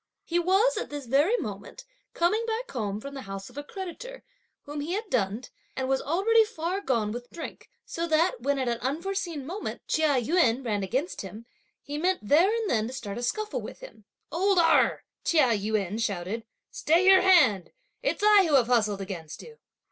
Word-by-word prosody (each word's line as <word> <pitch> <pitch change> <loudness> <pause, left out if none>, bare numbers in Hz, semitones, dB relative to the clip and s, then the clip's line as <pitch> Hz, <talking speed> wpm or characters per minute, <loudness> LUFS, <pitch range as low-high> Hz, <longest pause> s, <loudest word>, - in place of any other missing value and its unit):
He 345 +1 0
was, 385 +8 +3
at - - -3
this 290 -2 -6
very 290 - +3
moment, - - -7 0.3
coming 415 +7 +2
back 460 +2 -3
home 210 -5 -3
from 280 +5 -8
the 275 - -6
house 195 +1 -8
of 255 - -17
a - - -6
creditor, 390 +10 -8 0.4
whom 295 0 -6
he 305 +5 -3
had 415 0 -4
dunned, 220 +1 -1 0.2
and 260 0 -2
was 270 0 +1
already 405 +9 +3
far 375 -2 -3
gone 230 - 0
with 240 +2 -7
drink, 330 - -9 0.2
so 335 0 -3
that 335 +9 +2
when, 280 0 0
at 260 -2 -1
an 235 -1 -1
unforeseen 335 +2 -3
moment, 370 +8 -6
Chia 305 -4 +2
Yün 255 -2 +2
ran 210 -3 -1
against 260 - -2
him, 205 +4 -9 0.4
he 290 +1 -5
meant 360 - 0
there 335 - +5
and 455 -1 -1
then 220 - +1
to 250 - -7
start 210 -3 -5
a - - -5
scuffle 425 - -2
with - - -9
him. 225 - -13 0.3
"Old 380 +5 +2
Erh!" 335 -1 +4 0.2
Chia 305 -7 +3
Yün 210 0 -1
shouted, 205 +1 -3 0.3
"stay 335 +5 +2
your 380 0 +7
hand; 260 - +4 0.3
it's - - -1
I 415 -2 +6
who 300 - +3
have 255 -4 +5
hustled 215 -5 +1
against 170 -6 -7
you." 460 -1 -14
290 Hz, 195 wpm, -27 LUFS, 230-375 Hz, 0.4 s, your